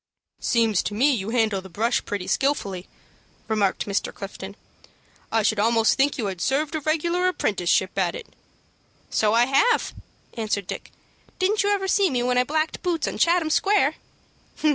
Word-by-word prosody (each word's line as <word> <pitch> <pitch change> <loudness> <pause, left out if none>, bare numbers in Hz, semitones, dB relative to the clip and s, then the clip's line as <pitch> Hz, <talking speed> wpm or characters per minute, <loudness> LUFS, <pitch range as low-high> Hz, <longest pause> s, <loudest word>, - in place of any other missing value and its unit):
"Seems 225 -5 +2
to 205 - -4
me 270 +7 +4
you 215 -5 -2
handle 220 -4 +1
the 190 - -12
brush 225 +7 0
pretty 200 -3 -4
skilfully," 200 -11 -1 0.6
remarked 210 -3 0
Mr. 200 -1 -2
Clifton. 195 0 -8 0.8
"I 225 -1 +2
should 220 0 +1
almost 225 +1 +3
think 275 +1 +1
you 230 - -2
had 190 -3 -4
served 280 +3 0
a 315 - -2
regular 340 +4 0
apprenticeship 190 - 0
at 175 -2 0
it." - - -7 0.9
"So 215 0 +2
I 235 +1 +5
have," 440 - +2 0.4
answered 215 -4 -2
Dick. - - -7 0.5
"Didn't 400 +3 +1
you 405 - +1
ever 395 -2 0
see 390 0 +3
me 245 -2 -1
when 250 0 +2
I - - +4
blacked 310 +3 -2
boots 345 -3 -1
on - - -4
Chatham 335 -2 +2
Square?" 405 +6 +3
240 Hz, 165 wpm, -24 LUFS, 205-315 Hz, 0.9 s, I